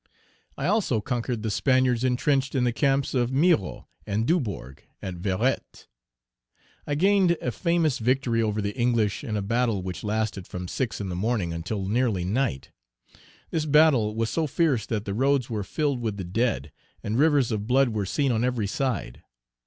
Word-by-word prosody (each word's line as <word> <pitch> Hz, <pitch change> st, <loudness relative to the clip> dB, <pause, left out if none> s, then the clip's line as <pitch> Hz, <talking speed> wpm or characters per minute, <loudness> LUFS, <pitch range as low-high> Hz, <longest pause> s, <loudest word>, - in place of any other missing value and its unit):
I 140 Hz, -, -3 dB
also 185 Hz, -, +1 dB
conquered 120 Hz, 0 st, -3 dB
the 110 Hz, -, -1 dB
Spaniards 130 Hz, 0 st, +2 dB
intrenched 135 Hz, +2 st, +1 dB
in 130 Hz, -, +2 dB
the 120 Hz, -1 st, +1 dB
camps 135 Hz, +1 st, +1 dB
of 125 Hz, -2 st, +1 dB
Miraut 140 Hz, -, +1 dB, 0.2 s
and 105 Hz, +2 st, 0 dB
Dubourg 105 Hz, -, -2 dB, 0.2 s
at 95 Hz, -2 st, -6 dB
Verrettes. 100 Hz, +8 st, -2 dB, 1.0 s
I 145 Hz, -, 0 dB
gained 190 Hz, 0 st, +3 dB
a 125 Hz, -, -2 dB
famous 165 Hz, -2 st, +1 dB
victory 120 Hz, -1 st, +1 dB
over 105 Hz, -1 st, -1 dB
the 100 Hz, 0 st, -3 dB
English 120 Hz, -4 st, +1 dB
in 105 Hz, -1 st, -2 dB
a 100 Hz, -, -2 dB
battle 115 Hz, -2 st, 0 dB
which 90 Hz, -2 st, -5 dB
lasted 105 Hz, -3 st, -2 dB
from 90 Hz, 0 st, -6 dB
six 110 Hz, -1 st, -3 dB
in 100 Hz, -, -4 dB
the 90 Hz, -, -3 dB
morning 100 Hz, -3 st, -1 dB
until 95 Hz, +4 st, -3 dB
nearly 110 Hz, -4 st, +1 dB
night. 100 Hz, -, -1 dB, 0.8 s
This 155 Hz, -2 st, -1 dB
battle 145 Hz, -8 st, +4 dB
was 115 Hz, 0 st, -1 dB
so 160 Hz, -2 st, 0 dB
fierce 140 Hz, -6 st, +1 dB
that 110 Hz, -2 st, -2 dB
the 100 Hz, -, -3 dB
roads 130 Hz, +1 st, +1 dB
were 105 Hz, -2 st, -2 dB
filled 140 Hz, +3 st, -1 dB
with 110 Hz, -3 st, -2 dB
the 95 Hz, -, -4 dB
dead, 90 Hz, -, -1 dB, 0.3 s
and 110 Hz, +4 st, -1 dB
rivers 145 Hz, -5 st, +3 dB
of 105 Hz, -1 st, -2 dB
blood 130 Hz, +1 st, +4 dB
were 105 Hz, -4 st, -2 dB
seen 140 Hz, +5 st, +1 dB
on 115 Hz, 0 st, +1 dB
every 125 Hz, -4 st, 0 dB
side. 120 Hz, -, -2 dB
120 Hz, 175 wpm, -26 LUFS, 105-135 Hz, 1.0 s, battle